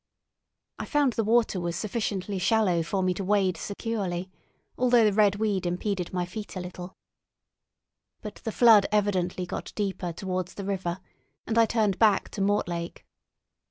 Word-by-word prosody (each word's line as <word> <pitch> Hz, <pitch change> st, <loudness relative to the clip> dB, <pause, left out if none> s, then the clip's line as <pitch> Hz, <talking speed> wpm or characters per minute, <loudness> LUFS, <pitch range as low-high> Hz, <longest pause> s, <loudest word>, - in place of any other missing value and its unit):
I -, -, -3 dB
found 290 Hz, -4 st, +2 dB
the 225 Hz, -, 0 dB
water 225 Hz, -3 st, +2 dB
was 170 Hz, -1 st, -3 dB
sufficiently 200 Hz, -1 st, -3 dB
shallow 190 Hz, -3 st, +2 dB
for 190 Hz, +4 st, -1 dB
me 185 Hz, 0 st, +2 dB
to 195 Hz, -, -5 dB
wade 190 Hz, -2 st, +2 dB
securely, 195 Hz, -4 st, -4 dB, 0.4 s
although 245 Hz, -2 st, +4 dB
the 210 Hz, -2 st, +3 dB
red 205 Hz, -1 st, +4 dB
weed 205 Hz, -4 st, -1 dB
impeded 180 Hz, 0 st, -2 dB
my 180 Hz, -1 st, -1 dB
feet 205 Hz, +4 st, -8 dB
a -, -, -3 dB
little; 180 Hz, 0 st, -8 dB, 1.3 s
but 210 Hz, -, -7 dB
the 225 Hz, -, -5 dB
flood 220 Hz, -3 st, +6 dB
evidently 185 Hz, -3 st, 0 dB
got -, -, -6 dB
deeper 195 Hz, -4 st, -2 dB
towards 185 Hz, +1 st, -4 dB
the 200 Hz, -, -6 dB
river, 190 Hz, -2 st, -3 dB, 0.4 s
and 225 Hz, -, -2 dB
I 230 Hz, -1 st, +5 dB
turned 215 Hz, -5 st, +1 dB
back 215 Hz, -3 st, +3 dB
to 200 Hz, -, -5 dB
Mortlake. 175 Hz, -4 st, -1 dB
195 Hz, 160 wpm, -27 LUFS, 180-215 Hz, 1.3 s, flood